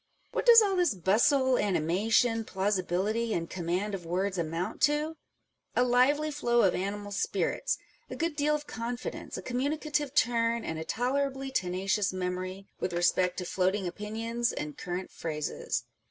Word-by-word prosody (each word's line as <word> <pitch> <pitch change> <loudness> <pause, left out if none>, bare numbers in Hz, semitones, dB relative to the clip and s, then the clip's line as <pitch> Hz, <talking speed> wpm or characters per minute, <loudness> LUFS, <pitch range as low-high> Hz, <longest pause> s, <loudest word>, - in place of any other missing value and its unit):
What - - -2
does 460 -2 +10
all 395 -2 +1
this 350 - +2
bustle, 250 - +3
anima 185 +2 0
tion, 225 -1 +3
plausibility, 200 +3 0
and 165 -1 -2
command 180 +4 -2
of 190 -3 -4
words 185 +3 -1
amount 170 +5 -3
to? 300 +2 -1 0.6
A 245 - +4
lively 270 +5 +3
flow 240 -5 +2
of 190 - +4
animal 205 +2 -3
spirits, 200 - 0 0.3
a - - -5
good 330 -2 -1
deal 300 +1 +2
of 300 0 -5
confidence, 240 0 -5
a - - -6
communicative 290 +2 -1
turn, 230 -1 +2
and 160 0 -3
a - - -3
tolerably 270 +5 -1
tenacious 195 -1 0
memory 185 +1 -4
with 180 - -2
respect 175 +1 +2
to 180 - -3
floating 190 +2 0
opinions 225 +5 -2
and 150 0 -5
current 180 +1 -5
phrases. 155 -2 -3
210 Hz, 155 wpm, -29 LUFS, 185-260 Hz, 0.6 s, does